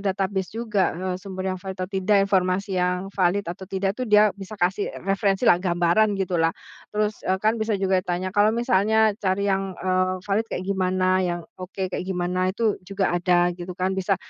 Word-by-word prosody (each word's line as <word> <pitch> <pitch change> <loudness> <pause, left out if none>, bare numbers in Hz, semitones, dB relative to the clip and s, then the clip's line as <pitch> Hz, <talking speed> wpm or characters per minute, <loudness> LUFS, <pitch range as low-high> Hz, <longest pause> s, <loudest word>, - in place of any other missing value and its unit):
database 190 -1 -1
juga, 215 -7 0
eee, 185 +1 -3
sumber 190 -1 -4
yang 185 - -5
valid 190 0 -6
atau 185 0 -5
tidak, 195 +1 +2
informasi 190 0 0
yang 180 +2 -1
valid 195 +1 +1
atau 180 +2 -7
tidak 195 +1 -1
tuh 255 - -2
dia 210 0 +5
bisa 200 +2 -9
kasih 190 +1 0 0.2
referensilah, 195 0 +2
gambaran, 180 +4 +2
gitulah. 175 -4 0 0.4
Terus, 210 0 0
eee, 185 - +3
kan 220 +1 +2
bisa 220 -1 0
juga 190 -1 +1
tanya, 180 +1 -3
"Kalau 205 +3 +3
misalnya 220 -1 +3
cari 195 -1 0
yang, 195 -1 -2
eee, 185 0 0
valid 205 +3 0
kayak 185 - -4
gimana? 185 -1 +1
Yang 175 -2 -1 0.2
oke 185 0 -5
kayak 180 - -3
gimana?" 180 0 -1
Itu 220 -3 0
juga 195 -2 0
ada, 175 0 +2
gitu 175 0 -8
kan, 185 +1 -1
bisa. 190 0 0
190 Hz, 185 wpm, -24 LUFS, 185-200 Hz, 0.4 s, dia